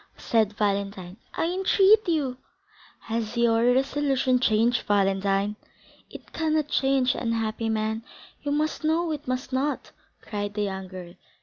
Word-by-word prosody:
said 220 -3 +1
Valentine; 200 -2 -2 0.2
"I - - 0
entreat 385 +4 +4
you." 280 -6 0 0.6
"Has 230 0 -3
your 230 -1 +3
resolution 270 -1 +1
changed, 235 +1 +2
Valentine?" 195 0 +1 0.5
"It - - -12
cannot 310 -2 0
change, 270 -2 +2
unhappy 225 -1 -2
man; 220 0 -1 0.4
you 290 - -3 0.3
know 325 +2 +1
it 300 -2 -5
must 255 +1 -3
not!" 280 +3 -1 0.3
cried 205 -1 -5
the 210 - 0
young 190 -1 -4
girl. 180 -2 -9
230 Hz, 125 wpm, -26 LUFS, 205-275 Hz, 0.6 s, entreat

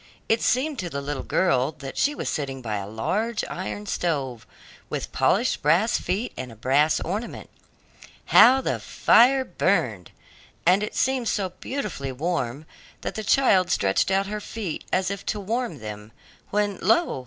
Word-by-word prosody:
It 225 0 +2
seemed 275 +3 +1
to 180 - -3
the 140 - -4
little 140 -1 -4
girl 145 -5 +1
that 140 -2 -8
she 295 +1 +1
was - - -4
sitting 135 -3 -3
by 110 -2 -2
a 100 -1 -5
large 210 - -1
iron 195 +3 -5
stove, 140 - -2 0.4
with - - -4
polished - - +1
brass 175 +10 +3
feet 210 +7 -2
and 130 -2 -6
a - - -12
brass 140 +7 +2
ornament. 205 +7 -5 0.7
How 265 +2 +7
the - - -1
fire 260 +3 +4
burned! 125 - 0 0.6
and 195 +5 +3
seemed 260 -2 0
so 195 -4 0
beautifully 180 - -5
warm 145 -1 -2 0.4
that - - -4
the 220 - -5
child 205 -5 +4
stretched 95 - +2
out 195 +1 +2
her 210 +1 -4
feet 200 -7 -5
as 185 +1 +1
if 200 0 -5
to 210 - -1
warm 220 - -2
them, 105 -1 -8 0.4
when, 205 -2 0
lo! 345 - +2
185 Hz, 160 wpm, -24 LUFS, 135-220 Hz, 0.7 s, How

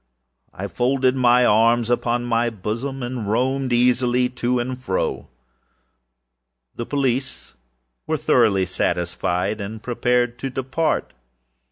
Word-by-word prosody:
I - - -6
folded 130 +1 +1
my 125 -1 +4
arms 115 +2 +3
upon 120 0 0
my 120 0 +1
bosom, 115 +6 -4
and 120 -4 -4
roamed 130 +3 0
easily 125 +1 +2
to 125 0 -1
and 125 +1 -3
fro. 95 -7 -2 1.5
The 120 - -5
police 135 -2 -2 0.5
were - - 0
thoroughly 95 -3 +3
satisfied 90 +3 -1
and 110 +2 -7
prepared 125 0 0
to 135 - -3
depart. 130 - -1
120 Hz, 115 wpm, -22 LUFS, 110-130 Hz, 1.5 s, my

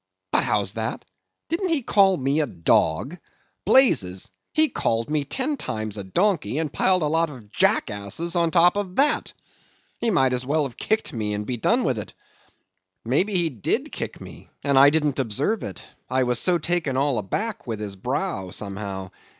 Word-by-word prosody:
But - - +3
how's - - 0
that? - - -4 0.4
didn't 355 +3 -1
he 315 -6 +1
call 195 -4 +4
me 135 +2 0
a 150 - +1
dog? 85 - +1 0.5
blazes! 115 - +3 0.2
he 315 0 +3
called 115 - -1
me 150 -2 +1
ten 275 - -2
times 110 - -4
a 100 - -4
donkey, 175 - 0
and 155 -3 -2
piled 185 -3 +2
a - - +2
lot 165 +2 +1
of 120 -8 -12
jackasses 100 - 0
on 170 -1 +3
top 175 +3 +4
of 190 -3 -3
that! 295 +2 +2 0.7
He 235 - +1
might 135 - +3
as 125 0 -1
well 150 +4 +1
have 135 -4 -5
kicked 220 +1 -1
me, 105 -3 -2
and 105 0 -4 0.2
done - - +3
with - - 0
it. - - -8 0.9
Maybe 180 - +1
he 170 -3 +1
did 115 -7 -2
kick - - -5
me, - - -12
and 140 -1 +1
I 140 +1 +9
didn't 150 -2 0
observe 135 - 0
it, 95 - -7 0.2
I 130 +1 +2
was 125 -1 +1
so 180 -1 +2
taken 165 -5 -1
all 140 -3 +1
aback 205 - -3
with 110 -3 -3
his 105 -2 -5
brow, 125 - -3
somehow. 100 -1 -5
145 Hz, 180 wpm, -24 LUFS, 110-180 Hz, 0.9 s, I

